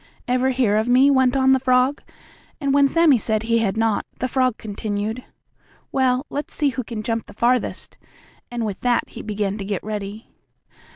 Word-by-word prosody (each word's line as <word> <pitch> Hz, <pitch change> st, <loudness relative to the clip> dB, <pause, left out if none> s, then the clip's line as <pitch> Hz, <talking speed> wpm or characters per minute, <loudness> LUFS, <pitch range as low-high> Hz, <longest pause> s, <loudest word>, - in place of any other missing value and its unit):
"Ever 255 Hz, +1 st, +2 dB
hear 245 Hz, -5 st, +2 dB
of 220 Hz, +3 st, 0 dB
me?" 260 Hz, +3 st, +5 dB
went 260 Hz, -1 st, +3 dB
on 265 Hz, 0 st, +4 dB
the 265 Hz, -, +4 dB
frog, 255 Hz, +2 st, +2 dB, 0.6 s
and 280 Hz, -3 st, 0 dB
when 280 Hz, 0 st, +5 dB
Sammie 310 Hz, -4 st, +4 dB
said 215 Hz, +1 st, -1 dB
he 230 Hz, 0 st, +2 dB
had 220 Hz, -2 st, -1 dB
not, 225 Hz, -2 st, +1 dB
the 255 Hz, -, -2 dB
frog 255 Hz, -2 st, +1 dB
continued: 215 Hz, +2 st, -4 dB, 0.7 s
"Well, 260 Hz, 0 st, +1 dB
let's 290 Hz, +1 st, -5 dB
see 295 Hz, -2 st, +2 dB
who 255 Hz, -1 st, -4 dB
can 220 Hz, -1 st, -6 dB
jump 230 Hz, 0 st, -2 dB
the -, -, -14 dB
farthest," 245 Hz, +3 st, -1 dB, 0.5 s
and 240 Hz, -2 st, -3 dB
with 200 Hz, -3 st, -5 dB
that 245 Hz, -1 st, +1 dB
he -, -, -9 dB
began 205 Hz, -1 st, -3 dB
to -, -, -4 dB
get 200 Hz, -1 st, -3 dB
ready. 210 Hz, 0 st, -6 dB
240 Hz, 185 wpm, -22 LUFS, 215-260 Hz, 0.7 s, me